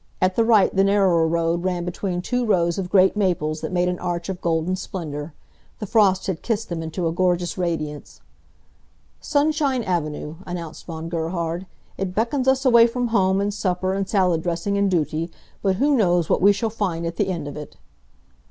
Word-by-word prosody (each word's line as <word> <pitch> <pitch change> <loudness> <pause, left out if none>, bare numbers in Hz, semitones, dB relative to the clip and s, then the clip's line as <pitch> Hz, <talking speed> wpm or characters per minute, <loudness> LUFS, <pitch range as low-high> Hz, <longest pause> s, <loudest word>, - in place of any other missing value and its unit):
At 185 0 +1
the 230 - +3
right 225 -4 +4
the 195 - +4
narrower 195 -5 +3
road 170 +1 0
ran 180 -2 -1
between 180 0 -3
two 245 +3 -1
rows 175 -5 +1
of 180 -2 -4
great 190 0 +4
maples 165 -6 0
that - - -4
made 180 0 +1
an 180 0 -2
arch 175 0 -3
of 185 -1 -5
golden 165 +2 0
splendor. 155 -5 -6 0.4
The 210 - -5
frost 200 -3 +3
had 190 -6 -3
kissed 225 -1 -2
them 170 -2 -3
into 165 +2 -4
a - - 0
gorgeous 175 0 0
radiance. 160 -5 -4 1.0
"Sunshine 290 -4 +1
Avenue," 155 -4 -3
announced 170 -3 -7
Von 165 -1 -6
Gerhard. 170 +1 -3 0.3
"It 185 -1 -3
beckons 250 +4 0
us 265 +1 +2
away 235 -2 +7
from 245 0 -2
home, 190 -3 +2
and 205 +1 -1
supper 185 -2 -1
and 195 0 -2
salad 180 -5 +2
dressing 175 +4 -2
and 200 0 +2
duty, 165 -1 -1 0.3
but 190 -2 +1
who 280 +7 +2
knows 175 -7 +2
what - - +2
we 200 +2 +7
shall 215 +2 -1
find 180 -6 -2
at 170 0 -4
the - - +1
end 170 -6 -3
of 145 - -7
it!" 150 -1 -9
185 Hz, 190 wpm, -22 LUFS, 170-205 Hz, 1.0 s, away